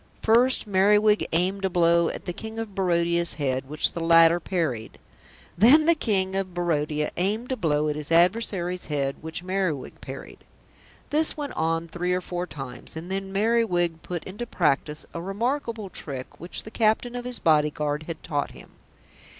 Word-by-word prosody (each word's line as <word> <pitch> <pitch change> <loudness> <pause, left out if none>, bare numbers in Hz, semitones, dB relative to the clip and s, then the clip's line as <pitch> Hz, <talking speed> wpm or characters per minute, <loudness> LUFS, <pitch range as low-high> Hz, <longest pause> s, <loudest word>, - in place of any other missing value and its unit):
First 240 +4 +4
Merriwig 210 +2 +3
aimed 185 +4 0
a 190 - +2
blow 170 -1 +3
at - - -7
the 180 - -3
King 220 +4 -8
of 225 -3 -5
Barodia's 170 -3 +2
head 135 -2 -2
which 150 +1 +2
the - - -5
latter 165 0 +5
parried. 160 - -3 0.6
Then 265 - +6
the 335 - +6
King 195 - 0
of 190 -2 -3
Barodia 150 -3 -1
aimed 215 +8 -1
a - - +1
blow 155 -7 0
at 150 - -1
his 150 +1 -4
adversary's 180 0 +2
head 140 -3 -1
which 160 +2 -6
Merriwig 185 -7 -2
parried. - - -9 0.7
This 310 +2 +3
went 290 -2 -4
on 165 +1 -1
three 180 +2 -2
or 180 - +1
four 180 0 -4
times, 135 -4 -7
and 165 +3 -7
then 195 0 -3
Merriwig 195 -6 +1
put 175 -2 -5
into 210 +6 -6
practice 150 -2 0
a 170 - -5
remarkable 225 +1 -3
trick 130 -3 -6
which 175 +3 -4
the 220 - -10
Captain 225 +2 +1
of 245 - -4
his 250 -1 0
Bodyguard 150 -1 +1
had 165 -2 -7
taught 145 -2 -2
him. - - -14
175 Hz, 170 wpm, -25 LUFS, 160-210 Hz, 0.7 s, Then